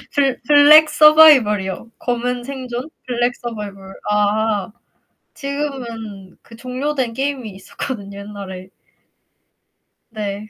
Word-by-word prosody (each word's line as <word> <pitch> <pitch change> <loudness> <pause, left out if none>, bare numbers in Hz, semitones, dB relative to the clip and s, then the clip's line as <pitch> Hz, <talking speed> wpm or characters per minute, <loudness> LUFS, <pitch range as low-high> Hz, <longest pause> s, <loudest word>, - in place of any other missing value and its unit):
블 275 -3 +1
블랙 300 +1 +7
서바이벌이요. 265 -11 +5
검은 245 0 -2
생존. 255 0 -6 0.2
블랙 245 0 0
서바이벌. 205 -5 -8 0.2
아 210 0 0 0.6
지금은 235 -9 -6
그 230 - -16
종료된 255 0 -3
게임이 265 -4 -3
있었거든요 200 0 -7
옛날에. 195 -2 -9 1.4
네. 210 -1 -6
235 Hz, 225 characters per minute, -19 LUFS, 205-275 Hz, 1.4 s, 블랙